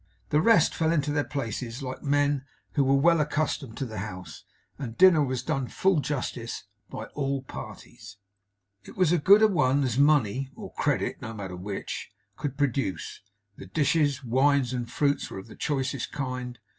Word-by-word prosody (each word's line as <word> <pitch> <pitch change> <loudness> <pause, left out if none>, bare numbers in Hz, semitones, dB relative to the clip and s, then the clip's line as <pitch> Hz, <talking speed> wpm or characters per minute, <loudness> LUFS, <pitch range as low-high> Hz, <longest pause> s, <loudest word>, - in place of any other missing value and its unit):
The 150 - +3
rest 210 -5 +5
fell 160 0 +1
into 150 -3 +1
their 145 0 +1
places 125 -2 -4
like 130 0 -5
men 145 -1 +1 0.3
who 140 - +3
were 135 +1 +3
well 165 +3 +4
accustomed 150 -5 -2
to 135 - -2
the 110 -4 -6
house; 95 -3 -8 0.3
and 120 -5 -6
dinner 180 -5 +7
was 130 -2 -2
done 135 -3 -1
full 190 +3 +2
justice 125 -5 -3
to, - - -28 0.3
by 110 - -5
all 140 -2 -2
parties. 100 -5 -10 0.7
It - - -13
was 180 -4 +3
a 175 - +3
good 200 +8 +6
a - - +8
one 140 -8 +2
as 130 -1 0
money 135 -3 +3
(or - - -9
credit, - - -1
no 115 0 -6
matter 95 -3 -6
which) 95 +2 -5 0.3
could 140 -2 -4
produce. 135 - -2 0.4
The - - -10
dishes, 145 - +1
wines, 130 +1 +2
and 120 -2 -3
fruits 145 -1 0
were - - -7
of 95 - -8
the 110 - -13
choicest 135 -3 -2
kind. 125 -3 -4
135 Hz, 180 wpm, -27 LUFS, 120-150 Hz, 0.7 s, a